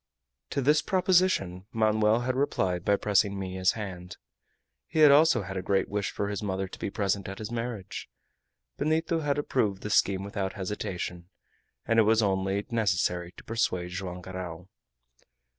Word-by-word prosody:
To 140 - -1
this 150 +3 +4
proposition 180 - +2
Manoel 110 0 +2
had 130 +1 -1
replied 95 -10 0
by 100 - +3
pressing 100 0 +1
Minha's 95 -1 0
hand. 90 -4 -7 0.7
He 155 -1 +5
also 145 -5 +6
had 95 +1 -6
a - - -1
great 95 +1 0
wish 100 -1 -1
for 100 - -3
his 105 - -3
mother 95 -2 -2
to - - -11
be - - -2
present 100 -1 -1
at 95 - -7
his 110 +1 -6
marriage. 115 -5 -5 0.7
Benito 160 +2 +1
had 145 -2 0
approved 110 -9 0
the 105 - -4
scheme 95 -2 +3
without 100 -1 -3
hesitation, 90 -2 -5 0.6
and 115 0 +3
it - - +8
was 110 +1 +4
only 95 0 0
necessary 90 -5 0
to - - -13
persuade 90 -6 -1
Joam 90 0 -5
Garral. 90 -1 -7
100 Hz, 160 wpm, -28 LUFS, 95-115 Hz, 0.7 s, it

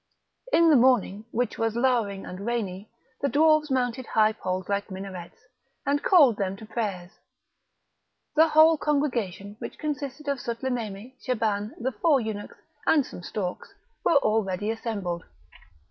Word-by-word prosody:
In 335 -7 +5
the - - +7
morning, 235 -5 +3
which 245 -1 -2
was 225 -1 0
lowering 235 -6 +1
and 180 - -8
rainy, 210 -4 -3 0.3
the 280 - +1
dwarfs 310 +1 +4
mounted 255 -1 -1
high 215 -1 +3
poles 185 -3 -3
like 200 0 -1
minarets, 185 -2 -8 0.5
and 285 +1 +1
called 285 - +5
them 195 -1 -1
to 220 - -10
prayers; 205 -5 -4 1.2
the 320 +1 +6
whole 315 0 +6
congregation, 235 - -1
which - - -7
consisted 290 -1 -4
of 280 -2 0
Sutlememe, 235 -2 -4
Shaban, 215 -3 -1
the 255 +3 -1
four 275 +5 +3
eunuchs, 220 -3 -5 0.3
and 290 -4 +4
some - - -9
storks, 185 - -5 0.3
were - - +3
already 215 -4 0
assembled. 200 -7 -4
225 Hz, 140 wpm, -26 LUFS, 200-275 Hz, 1.2 s, the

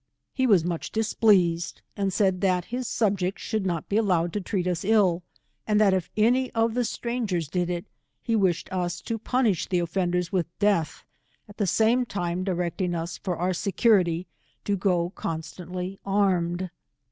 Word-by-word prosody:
He 260 -1 +1
was 190 -8 +4
much 170 -2 -3
displeased, 195 -6 +2
and 195 -1 0
said 190 -1 +1
that 180 -3 +2
his 250 -1 -2
subjects 195 -5 0
should 215 -4 -1
not 170 -3 -2
be 205 - 0
allowed 180 -6 +1
to 210 - -1
treat 185 -1 -2
us 180 -2 -1
ill, 195 -4 +3 0.5
and 210 -1 +3
that 205 -3 +5
if 185 -3 -1
any 250 +4 +3
of 225 0 +1
the 245 +1 +1
strangers 225 - -2
did 175 +3 -1
it, 175 +1 -3 0.3
he 230 - -1
wished 190 -5 +1
us 175 -2 -1
to 230 -1 -4
punish 230 -5 +1
the 185 - 0
offenders 175 0 0
with 185 -4 0
death, 200 -6 +1 0.4
at 205 - -14
the 205 - 0
same 235 +6 +3
time 175 -2 -2
directing 175 -1 -1
ns, 165 +2 -5
for 180 -3 -3
our 180 +2 0
security, 185 -3 +2 0.4
to 205 - +1
go 180 -3 +1
constantly 180 +3 -5
armed. 185 -3 +1
185 Hz, 170 wpm, -26 LUFS, 175-210 Hz, 0.5 s, that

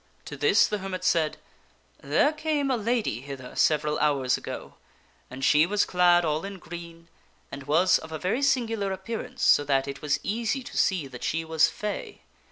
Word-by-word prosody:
To 145 - -7
this 145 +9 +4
the 210 - -2
hermit 185 -1 -5
said, 165 -4 +1 0.3
" - - -34
There 300 - +4
came 305 -3 -1
a - - +2
lady 230 - -1
hither 135 -2 -9
several 150 -1 +2
hours 135 -4 +2
ago, - - -8 0.5
and 130 +1 -4
she 150 +4 +5
was 205 +1 +1
clad 175 -1 +4
all 155 0 -1
in 195 0 -6
green, 170 -1 -10 0.4
and 140 0 -8
was 170 +5 +4
of 160 - -11
a 160 - -3
very 190 - -1
singular 225 -7 0
appearance, 235 +5 -5
so 145 - +5
that 135 -1 +1
it 140 0 -6
was 145 -1 0
easy 235 +5 -2
to - - -10
see 185 -6 +1
that 125 -2 -10
she 165 +1 -1
was 160 -1 +3
fay. 210 -1 -6
175 Hz, 185 wpm, -26 LUFS, 150-210 Hz, 0.5 s, she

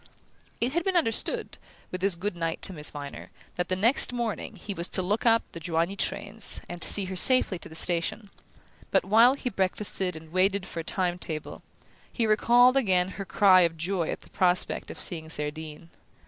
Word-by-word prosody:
It 240 +2 +1
had 345 +1 0
been 380 0 -1
understood, 225 -10 0 0.3
with 185 - -5
his 195 -2 +2
good 185 +2 -4
night 165 -1 -4
to 190 - +1
Miss 150 -3 0
Viner, 145 -1 -9 0.3
that 175 0 -3
the 185 - +1
next 230 +9 +3
morning 235 -3 -4
he 200 +2 -7
was 170 -1 -2
to - - -1
look 210 +6 -1
up 230 0 +4
the 170 - -8
Joigny 165 +3 -1
trains, 215 +2 -1
and 175 0 -3
see 200 - +3
her 185 0 -6
safely 205 -2 +4
to - - -4
the 160 - -11
station; 175 +5 0 0.6
but, - - +1
while 230 +6 +5
he 255 -3 -4
breakfasted 190 -1 0
and 160 0 -14
waited 190 +2 +1
for 170 - -7
a - - -4
time 180 +1 -2
table, 155 -3 -5 0.5
he 235 - 0
recalled 240 +4 +4
again 185 -7 +2
her 195 0 -7
cry 190 -2 +5
of 165 -2 +1
joy 170 0 -2
at - - -4
the - - -19
prospect 180 -1 0
of - - -9
seeing 160 -2 0
Cerdine. 155 +1 -4
185 Hz, 195 wpm, -26 LUFS, 170-215 Hz, 0.6 s, while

